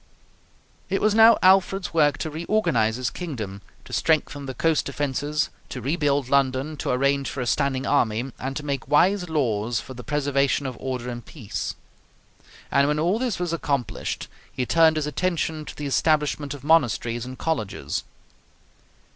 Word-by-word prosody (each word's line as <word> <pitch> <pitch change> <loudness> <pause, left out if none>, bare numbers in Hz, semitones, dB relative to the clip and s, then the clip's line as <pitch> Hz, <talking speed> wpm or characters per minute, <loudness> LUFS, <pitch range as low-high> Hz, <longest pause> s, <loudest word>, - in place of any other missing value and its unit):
It 195 - +1
was 215 -1 +2
now 225 +1 +7
Alfred's 190 0 +4
work 150 -3 +3
to 155 - -4
reorganize 155 - +1
his 125 0 -2
kingdom, 110 - -6 0.2
to - - -11
strengthen 145 -3 0
the 130 - -5
coast 160 +3 +1
defenses, 145 +2 -1 0.2
to 130 - -5
rebuild 145 0 0
London, 135 +2 +1
to - - -3
arrange 140 +2 +1
for 135 - -6
a 125 - -1
standing 135 0 0
army, 120 -2 +1
and 135 +1 -4
to 150 - -6
make 140 -2 -3
wise 180 +4 +3
laws 120 -6 0
for 130 - -9
the 125 -1 -9
preservation 140 +1 +1
of 130 -2 -4
order 130 -2 -4
and 120 -2 -6
peace; 120 -10 -5 1.0
and 140 0 +4
when 150 +1 +1
all 175 +8 +1
this 245 -5 -1
was 175 -2 -2
accomplished, 140 -8 -2 0.2
he 125 - -2
turned 160 +3 +4
his 155 -1 -1
attention 160 -1 -1
to - - -9
the 150 - -5
establishment 150 0 +1
of 140 - -12
monasteries 120 -6 +2
and 130 +1 -8
colleges. 110 - -2
145 Hz, 165 wpm, -24 LUFS, 130-160 Hz, 1.0 s, now